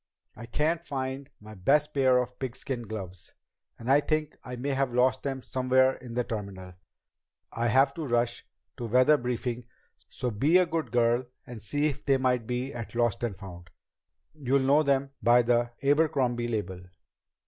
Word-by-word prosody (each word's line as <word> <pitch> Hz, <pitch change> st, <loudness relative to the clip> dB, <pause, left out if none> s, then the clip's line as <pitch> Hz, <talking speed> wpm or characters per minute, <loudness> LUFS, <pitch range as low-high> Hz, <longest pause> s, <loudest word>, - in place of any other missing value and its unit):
I 115 Hz, +1 st, -10 dB
can't 160 Hz, +7 st, 0 dB
find 135 Hz, -2 st, -4 dB
my 110 Hz, +1 st, -12 dB
best 140 Hz, +10 st, +2 dB
pair 130 Hz, -2 st, +4 dB
of 125 Hz, 0 st, -2 dB
pigskin 125 Hz, -2 st, -4 dB
gloves, 95 Hz, -5 st, -8 dB, 0.4 s
and 120 Hz, +3 st, -2 dB
I 140 Hz, -, +6 dB
think 155 Hz, 0 st, -1 dB
I 125 Hz, -, -6 dB
may 130 Hz, +4 st, -4 dB
have 135 Hz, -2 st, -1 dB
lost 130 Hz, +1 st, +3 dB
them 135 Hz, -2 st, -4 dB
somewhere 130 Hz, 0 st, +2 dB
in 120 Hz, -2 st, -10 dB
the 125 Hz, -, +1 dB
terminal. 100 Hz, -5 st, -6 dB, 0.8 s
I 115 Hz, +1 st, -1 dB
have 135 Hz, +4 st, +4 dB
to 160 Hz, -4 st, -5 dB
rush 120 Hz, -1 st, 0 dB, 0.3 s
to 120 Hz, -, -4 dB
weather 130 Hz, +6 st, +5 dB
briefing, 125 Hz, -2 st, -3 dB, 0.4 s
so 125 Hz, -, -3 dB
be 145 Hz, -, +3 dB
a 185 Hz, -, +4 dB
good 160 Hz, -7 st, -3 dB
girl 120 Hz, +1 st, +2 dB, 0.2 s
and 120 Hz, -3 st, -9 dB
see 145 Hz, +8 st, -1 dB
if 145 Hz, -3 st, -2 dB
they 135 Hz, -1 st, +3 dB
might 125 Hz, -3 st, 0 dB
be 125 Hz, +3 st, -3 dB
at 120 Hz, -2 st, -7 dB
Lost 120 Hz, -2 st, 0 dB
and 115 Hz, -5 st, -2 dB
Found. 90 Hz, -2 st, -11 dB, 0.6 s
You'll 140 Hz, -2 st, +1 dB
know 140 Hz, +3 st, +4 dB
them 140 Hz, -2 st, +1 dB
by 120 Hz, +1 st, +5 dB
the 120 Hz, 0 st, +2 dB
Abercrombie 140 Hz, -5 st, +2 dB
label." 105 Hz, -5 st, -3 dB
125 Hz, 170 wpm, -28 LUFS, 120-140 Hz, 0.8 s, I